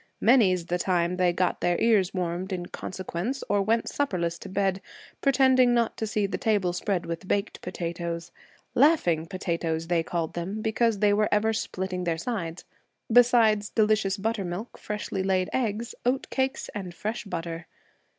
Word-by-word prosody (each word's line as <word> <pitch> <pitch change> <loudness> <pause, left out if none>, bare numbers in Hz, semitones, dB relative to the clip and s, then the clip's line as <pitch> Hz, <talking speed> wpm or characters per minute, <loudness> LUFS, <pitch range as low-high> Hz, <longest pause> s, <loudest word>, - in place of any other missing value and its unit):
Many's 195 -7 +4
the 175 +1 -1
time 180 -1 +1
they 180 -1 +3
got 180 0 0
their 175 -1 +1
ears 210 -5 +3
warmed 180 +1 -3
in 180 -2 -3
consequence 190 +8 -4
or 205 - +2
went 225 +3 +1
supperless 175 -11 -1
to 195 - -9
bed, 195 0 0 0.4
pretending 260 -2 +4
not 235 -1 +1
to 220 - -2
see 210 -1 0
the 195 - -3
table 200 -5 +1
spread 180 0 -1
with 170 +2 -5
baked 200 +2 -1
potatoes, 170 -1 -4 0.4
'laughing 210 - +3
potatoes,' 165 -3 -2
they 170 -2 +3
called 165 -1 -3
them, 195 +5 -4
because 225 0 +1
they 205 0 +3
were 210 +1 +2
ever 220 +2 +2
splitting 185 -3 -3
their 165 -1 0
sides, 170 -4 -4 0.5
besides 225 -4 +5
delicious 215 -2 +2
buttermilk, 205 -1 -3
freshly 210 -2 -4
laid 190 -1 0
eggs, 230 -2 -1
oat 255 +2 0
cakes 265 0 -1
and 185 -4 -6
fresh 215 +6 -3
butter. 165 -3 -5
195 Hz, 160 wpm, -27 LUFS, 175-220 Hz, 0.5 s, besides